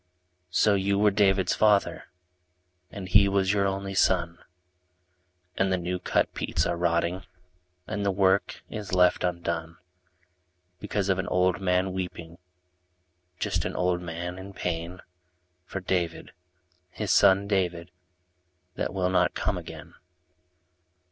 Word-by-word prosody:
lO 105 - +5
you 100 0 +1
were 105 0 +4
David's 95 -2 +2
father, 105 -2 +2 0.8
And 95 -2 -7
he 100 +2 +5
was 100 0 +1
your 100 -1 +2
only 95 0 -3
son, 85 -3 +1 1.2
And 95 0 +1
the 95 - +2
new 90 +1 -3
cut - - 0
peats - - -1
are - - 0
rotting 85 +1 0 0.6
And 105 0 -3
the 100 - +1
work 95 0 +1
is 105 -4 -5
left 90 -1 +3
undone. 85 -2 -3 1.0
Because 100 0 -2
of 95 -1 +2
an - - -2
old 90 +1 +1
man 90 0 +1
weeping, 85 -2 -6 1.0
Just - - -1
an - - -4
old 90 -1 0
man 90 +1 -5
in 100 +1 -9
pain. 90 0 -4 0.6
For 95 - -5
David, 90 -2 -2 0.6
his - - -3
son 95 +1 +5
David, 90 -4 -1 0.8
That - - -3
will 90 -1 0
not 95 - +2
come - - -1
again. - - -9
95 Hz, 130 wpm, -27 LUFS, 90-100 Hz, 1.2 s, lO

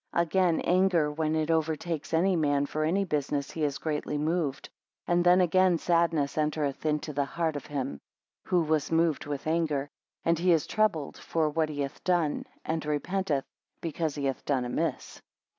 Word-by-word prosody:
16 - - +6
Again 175 0 +2
anger, 175 -4 +3
when 155 +1 -1
it 155 0 0
over. 160 -1 +1
takes 160 -1 -5
any 180 +3 +3
man 145 -3 +2
for 155 +2 -2
any 190 +6 +1
business 145 -3 -1
he 160 - -3
is 145 -2 0
greatly 150 -1 -2
moved; 150 -2 -1 0.4
and 175 0 +2
then 180 +1 +6
again 185 0 +4
sadness 165 -4 +1
entereth 150 -1 -1
into 150 0 -1
the 140 0 +1
heart 160 +1 -2
of 145 - -6
him, 135 - -4 0.4
who 175 -2 +2
was 155 -1 0
moved 165 -3 +1
with 145 -2 -4
anger, 155 -3 0 0.3
and 165 -1 +2
he 180 +1 +3
is 160 - +2
troubled 205 -9 0
for 160 -2 0
what 160 0 0
he 145 -1 -3
hath 140 -1 -5
done, 175 -5 +1 0.2
and 160 0 -1
repenteth, 150 0 -1 0.3
because 160 -2 -2
he 145 -2 -3
hath 135 -1 -2
done 130 -4 0
amiss. 120 - -3
155 Hz, 180 wpm, -28 LUFS, 145-170 Hz, 0.4 s, 16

